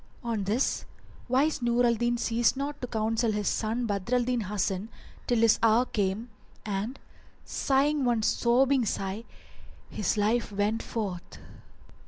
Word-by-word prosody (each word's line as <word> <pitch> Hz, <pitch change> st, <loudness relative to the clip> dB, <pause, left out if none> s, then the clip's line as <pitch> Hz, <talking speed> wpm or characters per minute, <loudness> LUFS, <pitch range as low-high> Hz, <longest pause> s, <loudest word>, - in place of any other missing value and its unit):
On 225 Hz, -4 st, -2 dB
this 225 Hz, +7 st, 0 dB, 0.4 s
wise 270 Hz, +4 st, +2 dB
Nur 240 Hz, +1 st, +2 dB
al 235 Hz, -, +4 dB
Din 240 Hz, +1 st, 0 dB
ceased 235 Hz, +1 st, +1 dB
not 285 Hz, +1 st, -4 dB
to 250 Hz, -, -3 dB
counsel 225 Hz, 0 st, 0 dB
his 210 Hz, -1 st, -1 dB
son 225 Hz, +3 st, 0 dB
Badr 205 Hz, +2 st, -1 dB
al 245 Hz, -, +3 dB
Din 245 Hz, -1 st, 0 dB
Hasan 200 Hz, 0 st, -2 dB, 0.4 s
till 240 Hz, -, +2 dB
his 225 Hz, -1 st, +4 dB
hour 230 Hz, +2 st, +4 dB
came 210 Hz, +2 st, -2 dB, 0.3 s
and, 210 Hz, +5 st, -3 dB, 0.5 s
sighing 280 Hz, +2 st, +1 dB
one 240 Hz, -3 st, +1 dB
sobbing 255 Hz, +4 st, +3 dB
sigh, 200 Hz, +1 st, -3 dB, 0.7 s
his 210 Hz, 0 st, -1 dB
life 215 Hz, +2 st, +1 dB
went 205 Hz, +3 st, 0 dB
forth. 195 Hz, -6 st, -5 dB
230 Hz, 145 wpm, -28 LUFS, 210-245 Hz, 0.7 s, al